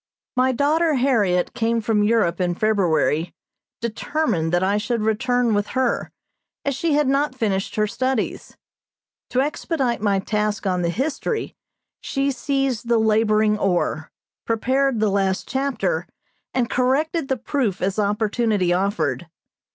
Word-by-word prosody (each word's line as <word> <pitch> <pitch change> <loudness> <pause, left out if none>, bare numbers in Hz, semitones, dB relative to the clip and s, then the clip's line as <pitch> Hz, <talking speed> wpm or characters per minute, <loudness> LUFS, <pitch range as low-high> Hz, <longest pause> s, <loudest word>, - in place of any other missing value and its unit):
My 255 +1 +3
daughter 300 +5 +2
Harriot 215 -9 +2
came 230 0 0
from 215 -1 +1
Europe 205 -5 +2
in 175 -1 0
February, 175 -5 +1 0.5
determined 230 - -1
that 175 +1 +2
I 200 +2 +2
should 215 +1 -1
return 245 +2 +1
with 205 0 0
her, 255 -2 0 0.5
as 280 - +1
she 320 +3 0
had 295 -1 +2
not 275 0 +1
finished 205 -6 -1
her 215 - +2
studies. 255 +2 -2 0.7
To 255 - +1
expedite 275 -4 -1
my 200 -2 +2
task 210 +2 -1
on 180 -2 0
the 170 - 0
History 280 - -2 0.4
she 275 0 -1
seized 270 -3 -1
the 235 -1 +3
laboring 215 -1 +2
oar, 175 -4 0 0.3
prepared 260 +2 +1
the 215 -1 +2
last 195 -1 0
chapter 235 -11 -1 0.4
and 250 -2 0
corrected 270 +6 0
the 265 -1 0
proof 225 -6 -1
as 195 +3 -1
opportunity 210 -2 +1
offered. 200 +5 -1
225 Hz, 135 wpm, -22 LUFS, 200-265 Hz, 0.7 s, My